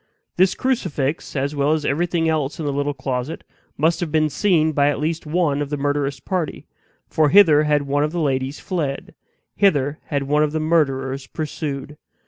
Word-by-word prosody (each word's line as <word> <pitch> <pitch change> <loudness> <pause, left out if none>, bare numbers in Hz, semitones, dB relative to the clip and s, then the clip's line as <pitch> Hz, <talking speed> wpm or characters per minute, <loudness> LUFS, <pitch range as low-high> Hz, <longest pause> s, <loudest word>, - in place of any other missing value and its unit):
This 185 +1 +3
crucifix, 160 - -2
as 140 +2 -1
well 145 +2 +2
as 155 -2 -1
everything 165 +2 0
else 155 -2 -1
in 155 - -3
the 145 - -1
little 145 +1 -1
closet, 130 +2 -4 0.3
must 160 +3 +2
have 170 -4 -3
been 155 -1 +2
seen 165 -5 +2
by 145 -1 +2
one - - +4
at 145 - -4
least 160 +1 -2
of 150 -4 0
the 145 - -2
murderous 140 -1 -1
party; 175 +1 -3 0.4
for 155 -2 +2
hither 155 -4 +6
had 150 -1 +2
one 140 +1 0
of 150 - -1
the 175 - -3
ladies 135 -2 -1
fled; 150 -7 -3 0.4
hither 150 -7 +2
had 140 -2 -2
one 150 +2 +1
of 150 0 +1
the 160 - 0
murderers 135 -4 0
pursued. 150 -1 -5
150 Hz, 185 wpm, -21 LUFS, 140-160 Hz, 0.4 s, hither